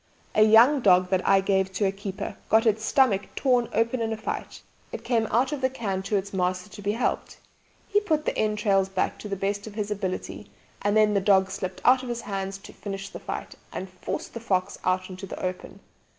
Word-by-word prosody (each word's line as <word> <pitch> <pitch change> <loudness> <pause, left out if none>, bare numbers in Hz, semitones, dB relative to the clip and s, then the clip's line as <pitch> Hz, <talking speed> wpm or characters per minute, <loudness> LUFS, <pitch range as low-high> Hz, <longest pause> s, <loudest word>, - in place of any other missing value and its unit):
A 215 - +3
young 230 +7 +7
dog 185 -3 +4
that 185 -1 +2
I 195 -1 +5
gave 190 -1 +1
to 200 - 0
a 190 - +2
keeper 195 0 -6
got 225 +1 +4
its 220 -1 +2
stomach 220 -5 +2
torn 250 -3 +2
open 230 +2 +1
in 225 0 -1
a 220 - -2
fight. 220 - -5 0.3
It - - -6
came 225 -3 +1
out 250 +4 +2
of 295 -2 -3
the 260 - +2
cairn 205 -7 -3
to 200 +2 -2
its 200 +1 -4
master 185 +1 -1
to 205 - -10
be 205 +1 0
helped. 235 - -2 0.5
He 410 - +3
put 315 -7 0
the - - -1
entrails 210 -3 +1
back 195 - -1
to 210 - -7
the 200 - -1
best 200 +2 -2
of 210 - -9
his 210 -1 -3
ability, 190 -3 -4 0.3
and 205 +1 +2
then 215 -1 +4
the 200 - +2
dog 190 -1 +4
slipped 190 -1 -5
out 255 0 +6
of 255 - -7
his 235 -1 -3
hands 195 -1 -4
to 195 - -13
finish 195 -1 -6
the - - -8
fight, - - -6 0.2
and 190 - -5
forced 185 - -5
the 230 - -5
fox 185 -5 -1
out 185 0 0
into 185 +2 -8
the - - -7
open! 185 +1 -5
205 Hz, 225 wpm, -26 LUFS, 190-225 Hz, 0.5 s, young